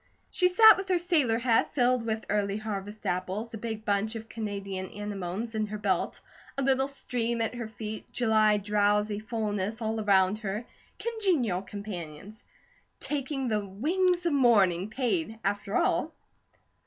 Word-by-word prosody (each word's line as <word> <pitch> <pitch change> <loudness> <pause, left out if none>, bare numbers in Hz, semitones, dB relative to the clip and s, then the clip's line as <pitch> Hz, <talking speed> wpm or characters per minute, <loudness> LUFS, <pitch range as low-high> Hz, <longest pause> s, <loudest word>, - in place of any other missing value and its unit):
She 360 - +3
sat 435 +3 +8
with 385 0 -5
her 365 - +4
sailor 315 -10 +2
hat 230 -1 +1
filled 250 -2 +3
with 220 0 -2
Early 200 -1 0
Harvest 210 -1 -6
apples, 185 +6 -2
a - - -4
big 220 -1 -5
bunch 205 +2 0
of 225 0 -7
Canadian 200 -4 -5
anemones 205 +2 -5
in 215 -1 -1
her 215 +1 -5
belt, 195 -3 -1 0.4
a 275 - 0
little 265 0 +2
stream 240 -4 -2
at 225 +1 -1
her 240 -2 -5
feet, 215 0 -7
July 215 -3 +3
drowsy 210 0 +1
fullness 215 -1 -2
all 220 -1 -2
around 195 0 +3
her, 210 +2 -4 0.3
congenial 360 - 0
companions; 200 0 -8 0.6
taking 275 -2 -2
the 215 -3 0
"wings 345 - 0
of 335 - +2
morning" 205 -8 +4
paid, 250 0 -1
after 200 +1 -1
all. - - +1
220 Hz, 150 wpm, -28 LUFS, 205-245 Hz, 0.6 s, sat